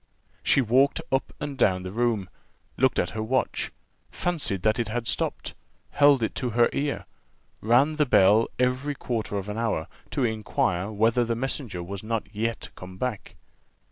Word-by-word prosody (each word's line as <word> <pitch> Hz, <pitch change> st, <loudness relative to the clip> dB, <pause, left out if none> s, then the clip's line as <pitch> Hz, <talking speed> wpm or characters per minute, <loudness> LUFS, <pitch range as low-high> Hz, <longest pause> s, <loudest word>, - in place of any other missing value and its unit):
She 140 Hz, -, +4 dB
walked 130 Hz, +4 st, +3 dB
up 135 Hz, 0 st, 0 dB
and 145 Hz, -1 st, -4 dB
down 90 Hz, -1 st, +3 dB
the 90 Hz, -, -5 dB
room 115 Hz, -3 st, 0 dB, 0.5 s
looked 130 Hz, +1 st, +2 dB
at -, -, 0 dB
her 110 Hz, -, -4 dB
watch 125 Hz, +4 st, -1 dB, 0.4 s
fancied 155 Hz, -, -2 dB
that 110 Hz, +2 st, +2 dB
it 120 Hz, -, 0 dB
had 115 Hz, +1 st, -3 dB
stopped -, -, -2 dB, 0.4 s
held 145 Hz, -4 st, +5 dB
it 110 Hz, -, -1 dB
to 125 Hz, -, -1 dB
her 120 Hz, -, +5 dB
ear 145 Hz, 0 st, -2 dB, 0.6 s
ran 130 Hz, +8 st, +3 dB
the 150 Hz, -2 st, +3 dB
bell 105 Hz, +1 st, +5 dB
every 125 Hz, +3 st, 0 dB
quarter 115 Hz, -5 st, -3 dB
of 100 Hz, 0 st, -4 dB
an 105 Hz, +2 st, -4 dB
hour, 115 Hz, -9 st, 0 dB, 0.2 s
to 140 Hz, -, -1 dB
inquire 105 Hz, -3 st, -1 dB
whether 115 Hz, +3 st, +2 dB
the 115 Hz, 0 st, -1 dB
messenger 120 Hz, -7 st, -3 dB
was 95 Hz, +2 st, -6 dB
not 115 Hz, 0 st, -2 dB
yet 115 Hz, +2 st, -3 dB
come 90 Hz, 0 st, -10 dB
back. 125 Hz, -1 st, -4 dB
115 Hz, 170 wpm, -26 LUFS, 105-130 Hz, 0.6 s, held